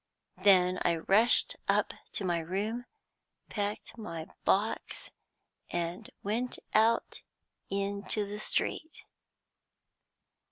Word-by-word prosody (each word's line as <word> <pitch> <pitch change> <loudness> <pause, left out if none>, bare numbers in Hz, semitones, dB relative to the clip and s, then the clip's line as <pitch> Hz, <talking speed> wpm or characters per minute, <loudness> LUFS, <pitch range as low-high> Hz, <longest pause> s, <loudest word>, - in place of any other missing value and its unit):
Then 185 -2 +5
I 170 - +3
rushed 205 +8 +4
up - - +2 0.2
to 195 - 0
my 175 -2 +1
room, 205 +8 -3 0.6
packed 205 +2 -3
my 165 -7 -5 0.2
box, 210 +3 0 0.6
and 170 0 -3
went 235 +5 0 0.2
out 225 +2 +3 0.5
into 200 +1 -1
the 205 +1 -6
street. 315 +8 -2
200 Hz, 90 wpm, -31 LUFS, 180-220 Hz, 0.6 s, Then